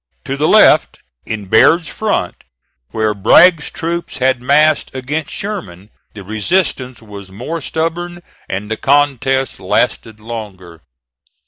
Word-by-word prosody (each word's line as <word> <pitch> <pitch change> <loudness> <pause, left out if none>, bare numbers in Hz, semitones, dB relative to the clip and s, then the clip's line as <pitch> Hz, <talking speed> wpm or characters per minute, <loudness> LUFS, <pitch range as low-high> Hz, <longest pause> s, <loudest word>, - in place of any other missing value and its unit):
To 135 - -3
the 150 +3 0
left, - - +5 0.3
in 110 -2 -4
Baird's 155 - +4
front 210 - -3 0.5
where 110 -1 -1
Bragg's 155 - +4
troops 170 +1 -4
had 130 -1 +1
massed 150 +2 +2
against 145 +4 -3
Sherman, 110 - -7 0.2
the 100 - -9
resistance 125 - -2
was 100 -2 -11
more 160 +12 -5
stubborn 175 +3 -4 0.3
and 100 +3 -5
the 110 - -1
contest 135 -1 +1
lasted 110 -1 -1
longer. 100 -7 -9
130 Hz, 120 wpm, -16 LUFS, 105-160 Hz, 0.5 s, left